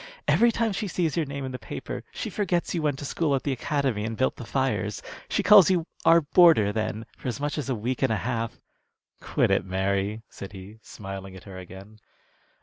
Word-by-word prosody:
Every 235 0 +5
time 225 -1 0
she 210 +1 -2
sees 165 -4 -1
your 165 -4 0
name 140 0 -5
in 130 - -5
the 125 - -6
paper - - -6
she - - -5
forgets 180 -4 -1
you 170 - -1
went 145 -3 0
to 145 - -6
school 145 0 0
at 135 - -2
the 140 - -1
Academy 130 -4 -1
and 110 0 -4
built 130 - +1
the 120 - -8
fires. 130 -5 -1 0.3
She - - 0
calls 200 -4 +8
you 175 -3 +2 0.2
'our 170 0 +7
boarder' 150 - +5
then, 110 0 -2
for - - -8
as 125 - -3
much 145 0 -2
as 145 -3 -4
a 130 - +1
week 120 +4 -3
and - - +2
a 110 - +1
half." 115 -2 -2 0.6
"Quit - - +1
it, - - +3
Mary," 100 +3 -1
said 100 +1 -10
he, 100 +3 -11
smiling 95 -2 -8
at 95 - -12
her 95 -2 -9
again. 95 +4 -12
125 Hz, 220 wpm, -26 LUFS, 105-155 Hz, 0.6 s, calls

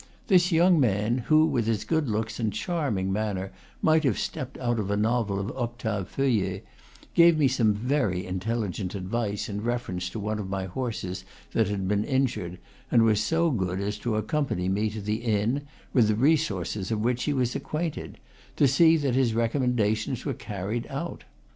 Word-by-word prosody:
This 180 -2 +5
young 170 +1 +5
man, 115 0 +2
who, 155 0 +6
with 115 -8 0
his 110 -3 0
good 160 -5 0
looks 110 +1 -2
and 110 -3 0
charming 110 - -1
manner, 100 -2 -2 0.3
might 160 0 +4
have 130 -7 +2
stepped 130 - -4
out 120 -2 -1
of 100 -2 -2
a 100 - +1
novel 110 -2 +1
of 100 +5 -4
Octave 115 -6 -3
Feuillet, 105 -8 0 0.5
gave 170 -1 +6
me 145 -3 +4
some 120 -4 +2
very 110 -6 0
intelligent 95 0 -3
advice 100 +2 -2
in 105 -1 -4
reference 105 -7 -2
to 110 - -6
one 105 +1 -2
of 95 -2 -5
my 95 -1 -2
horses 95 -3 -4 0.3
that 110 -3 +2
had 100 -2 -2
been 105 +1 +1
injured, 130 -10 -1 0.3
and 115 -2 +5
was 110 -2 +3
so 165 +5 +2
good 95 -6 -1
as 105 +1 -3
to 115 -1 -1
accompany 110 - -1
me 105 +3 +1
to 105 0 -6
the 105 +2 -1
inn, 115 +5 0 0.3
with 120 -5 +5
the 105 - +2
re 140 +9 +5
sources 95 - -3
of 110 -2 -1
which 125 +2 0
he 150 - +1
was 125 -2 0
acquainted, 155 +3 -4 0.4
to 140 - +4
see 165 +4 +5
that 140 -5 0
his 125 -3 +2
recommendations 115 -1 0
were 140 - -1
carried 105 +1 -4
out. - - -5
110 Hz, 185 wpm, -27 LUFS, 100-130 Hz, 0.5 s, who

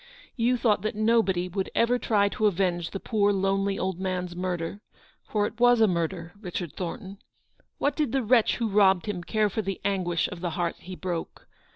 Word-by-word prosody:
You 245 +1 +2
thought 220 -5 +2
that 215 +1 -2
nobody 215 -5 +2
would 190 +1 -3
ever 245 +2 +3
try 205 -4 +2
to 215 +1 +1
avenge 175 -3 0
the 195 - -5
poor, 205 -1 +1
lonely 195 0 0
old 185 -2 -2
man's 180 -2 -3
murder 180 +1 -3 0.2
— - - -32
for 210 -1 +1
it 220 +2 -6
was 245 0 +5
a 220 - +6
murder, 170 -1 -2
Richard 175 -5 -5
Thornton! 195 +2 -6 0.6
"What 285 - 0
did 300 -6 0
the 270 -1 0
wretch 230 0 +4
who 235 - -1
robbed 195 -3 +4
him 185 -4 -4
care 215 +3 +1
for 205 +2 -2
the 195 -2 -4
anguish 175 -4 0
of 180 - -8
the 180 - -1
heart 175 -1 -1
he 185 0 -9
broke? 175 -2 -5
195 Hz, 200 wpm, -27 LUFS, 180-215 Hz, 0.6 s, a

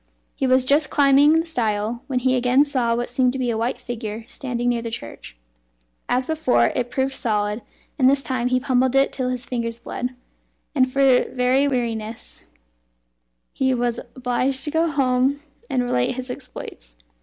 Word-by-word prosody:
He 265 - -1
was 255 0 +4
just 285 +2 +3
climbing 285 +1 +5
the 325 - -1
stile, 225 -6 -1
when 260 - -1
he 255 +1 +2
again 250 +3 +3
saw 250 -5 0
what 240 +1 -2
seemed 250 0 +1
to - - -3
be 250 -2 0
a 225 - -2
white 235 +2 -1
figure 225 -2 -6
standing 245 -3 -3
near 240 -1 0
the 230 - -4
church. 115 - -8 0.7
As 255 +1 +2
before, 315 -4 +2
it 245 -1 -1
proved 265 +1 -1
solid, 210 -3 -1 0.4
and 260 -1 +6
this 275 0 +2
time 250 -2 -1
he 255 0 +2
pummelled 255 0 +1
it 270 0 +4
till 255 -2 -2
his 250 -1 -3
fingers 230 -2 -3
bled, 250 +1 -5 0.6
and 255 -3 +2
for 270 -2 +4
very 255 +2 +2
weariness 230 -4 -4 1.1
he 260 -1 +1
was 240 -1 -1 0.2
obliged 255 +1 -1
to 300 - -3
go 325 +2 +2
home 270 0 +1 0.3
and 250 -1 +1
relate 125 - 0
his 255 0 -5
exploits. - - -9
255 Hz, 175 wpm, -22 LUFS, 240-270 Hz, 1.1 s, and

